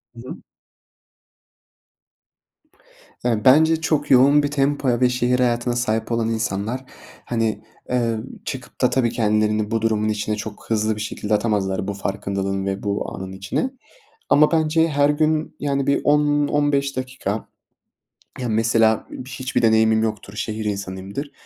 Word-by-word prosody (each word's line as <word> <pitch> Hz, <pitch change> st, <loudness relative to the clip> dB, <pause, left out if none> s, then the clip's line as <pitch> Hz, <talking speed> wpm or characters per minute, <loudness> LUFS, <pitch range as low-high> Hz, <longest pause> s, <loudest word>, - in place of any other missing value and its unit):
Hı 115 Hz, -, -10 dB
hı. -, -, -6 dB, 2.9 s
Ya, 115 Hz, -4 st, 0 dB
bence 160 Hz, +4 st, +5 dB
çok 150 Hz, -3 st, 0 dB
yoğun 140 Hz, +3 st, +6 dB
bir 145 Hz, -, -1 dB
tempoya 135 Hz, -3 st, +1 dB
ve 125 Hz, -, +5 dB
şehir 125 Hz, 0 st, +1 dB
hayatına 120 Hz, -1 st, +1 dB
sahip 115 Hz, -1 st, -1 dB
olan 115 Hz, -1 st, 0 dB
insanlar, 115 Hz, +3 st, -2 dB, 0.4 s
hani, 115 Hz, -2 st, -1 dB, 0.3 s
eee, 120 Hz, -2 st, 0 dB, 0.3 s
çıkıp 130 Hz, -2 st, -7 dB
da 125 Hz, -, +4 dB
tabii 125 Hz, -3 st, +1 dB
kendilerini 105 Hz, -1 st, +1 dB
bu 115 Hz, -1 st, 0 dB
durumun 110 Hz, -1 st, +1 dB
içine 105 Hz, 0 st, -1 dB
çok 105 Hz, 0 st, -8 dB
hızlı 110 Hz, -1 st, +1 dB
bir 105 Hz, -, -6 dB
şekilde 105 Hz, 0 st, -3 dB
atamazlar 105 Hz, -3 st, 0 dB
bu 100 Hz, -, -2 dB
farkındalığın 95 Hz, 0 st, -3 dB
ve 95 Hz, 0 st, -3 dB
bu 100 Hz, -1 st, -2 dB
anın 95 Hz, 0 st, -7 dB
içine. 95 Hz, -, -2 dB, 0.6 s
Ama 150 Hz, +1 st, +5 dB
bence 160 Hz, 0 st, +2 dB
her 145 Hz, -1 st, +3 dB
gün, 155 Hz, +1 st, 0 dB
yani, 140 Hz, -1 st, -1 dB
bir 140 Hz, -, +2 dB
10-15 145 Hz, -1 st, +2 dB
dakika 130 Hz, -5 st, -4 dB, 0.9 s
Ya, 125 Hz, -2 st, -2 dB
mesela 110 Hz, 0 st, +2 dB, 0.2 s
hiçbir 130 Hz, 0 st, -2 dB
deneyimim 110 Hz, -1 st, +4 dB
yoktur, 105 Hz, -2 st, -4 dB
şehir 110 Hz, 0 st, -4 dB
insanıyımdır 100 Hz, +6 st, -4 dB
115 Hz, 135 wpm, -22 LUFS, 105-140 Hz, 2.9 s, yoğun